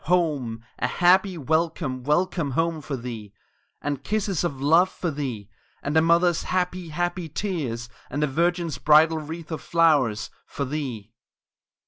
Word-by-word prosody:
Home! 145 Hz, -10 st, 0 dB
a -, -, +1 dB
happy 185 Hz, +1 st, +3 dB
"Welcome 160 Hz, -3 st, -1 dB
welcome 150 Hz, +1 st, +1 dB
home" 165 Hz, -1 st, 0 dB
for 140 Hz, -2 st, -4 dB
thee! 115 Hz, -4 st, -7 dB, 0.5 s
And 145 Hz, -2 st, -2 dB
kisses 205 Hz, -5 st, -1 dB
of 145 Hz, -6 st, -2 dB
love 165 Hz, +7 st, +4 dB
for 175 Hz, -, -3 dB
thee 130 Hz, -9 st, -4 dB, 0.4 s
And 145 Hz, +2 st, -2 dB
a 160 Hz, -, +6 dB
mother's 170 Hz, +1 st, +3 dB
happy, 180 Hz, -1 st, -2 dB
happy 175 Hz, +1 st, -2 dB
tears, 145 Hz, -, -3 dB, 0.2 s
and 145 Hz, +3 st, -1 dB
a -, -, +3 dB
virgin's 170 Hz, +3 st, 0 dB
bridal 155 Hz, +1 st, +5 dB
wreath 160 Hz, +2 st, -7 dB
of 160 Hz, -, -4 dB
flowers 145 Hz, -11 st, +2 dB, 0.2 s
For 140 Hz, -, -3 dB
thee! 125 Hz, -7 st, -5 dB
155 Hz, 145 wpm, -25 LUFS, 135-175 Hz, 0.5 s, a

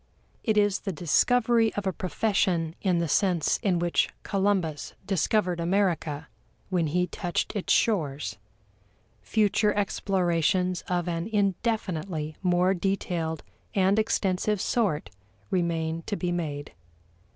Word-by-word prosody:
It 220 Hz, -2 st, +1 dB
is 205 Hz, -1 st, +3 dB
the 195 Hz, -, -4 dB
discovery 225 Hz, +7 st, +3 dB
of 205 Hz, -, -3 dB
a 190 Hz, -, 0 dB
profession 185 Hz, -3 st, 0 dB
in 185 Hz, -3 st, +2 dB
the 170 Hz, 0 st, 0 dB
sense 175 Hz, -1 st, +2 dB
in 190 Hz, -6 st, +2 dB
which 175 Hz, 0 st, +1 dB
Columbus 190 Hz, -6 st, -1 dB
discovered 185 Hz, -1 st, +1 dB
America 170 Hz, -4 st, 0 dB, 0.4 s
when 175 Hz, -3 st, +1 dB
he 180 Hz, +4 st, +1 dB
touched 175 Hz, +3 st, -3 dB
its 200 Hz, -, -1 dB
shores. 145 Hz, -, +1 dB, 0.8 s
Future 210 Hz, -1 st, +2 dB
explorations 185 Hz, -2 st, +1 dB
of 175 Hz, -1 st, -1 dB
an 170 Hz, +1 st, -2 dB
indefinitely 190 Hz, -6 st, -1 dB
more 180 Hz, 0 st, +3 dB
detailed 175 Hz, -4 st, -2 dB, 0.3 s
and 195 Hz, +2 st, +3 dB
extensive 205 Hz, -1 st, 0 dB
sort 195 Hz, -8 st, 0 dB, 0.4 s
remain 165 Hz, -2 st, 0 dB
to 205 Hz, -, -1 dB
be 180 Hz, -3 st, -2 dB
made. 150 Hz, -5 st, -4 dB
180 Hz, 120 wpm, -27 LUFS, 165-205 Hz, 0.8 s, is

